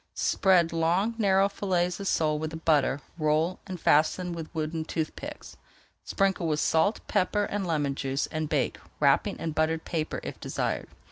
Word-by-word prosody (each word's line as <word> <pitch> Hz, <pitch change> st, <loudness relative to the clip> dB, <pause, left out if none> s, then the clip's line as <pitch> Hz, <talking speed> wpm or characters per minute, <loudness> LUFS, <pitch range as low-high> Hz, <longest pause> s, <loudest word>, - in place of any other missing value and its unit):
Spread 175 Hz, -4 st, +3 dB
long 175 Hz, +7 st, +1 dB
narrow 195 Hz, -2 st, +4 dB
fillets 180 Hz, -3 st, -1 dB
of 200 Hz, -, -4 dB
sole 155 Hz, -3 st, +1 dB
with 155 Hz, 0 st, -3 dB
the 160 Hz, -, -6 dB
butter, 145 Hz, -4 st, +2 dB, 0.2 s
roll 155 Hz, +4 st, +1 dB
and 185 Hz, -2 st, -6 dB
fasten 170 Hz, +5 st, +2 dB
with 165 Hz, -2 st, -6 dB
wooden 160 Hz, 0 st, -2 dB
tooth 155 Hz, 0 st, -3 dB
picks. 295 Hz, +1 st, -9 dB, 0.5 s
Sprinkle 195 Hz, -4 st, 0 dB
with 150 Hz, -1 st, 0 dB
salt, 165 Hz, +9 st, +2 dB
pepper, 205 Hz, +3 st, +1 dB
and 200 Hz, -2 st, -2 dB
lemon 145 Hz, -4 st, 0 dB
juice, 135 Hz, 0 st, -1 dB
and 155 Hz, -1 st, -2 dB
bake, 145 Hz, -5 st, 0 dB, 0.2 s
wrapping -, -, +3 dB
in 165 Hz, -, -3 dB
buttered 160 Hz, +1 st, 0 dB
paper 160 Hz, -2 st, -2 dB
if -, -, -7 dB
desired. -, -, -2 dB
165 Hz, 165 wpm, -28 LUFS, 155-185 Hz, 0.5 s, narrow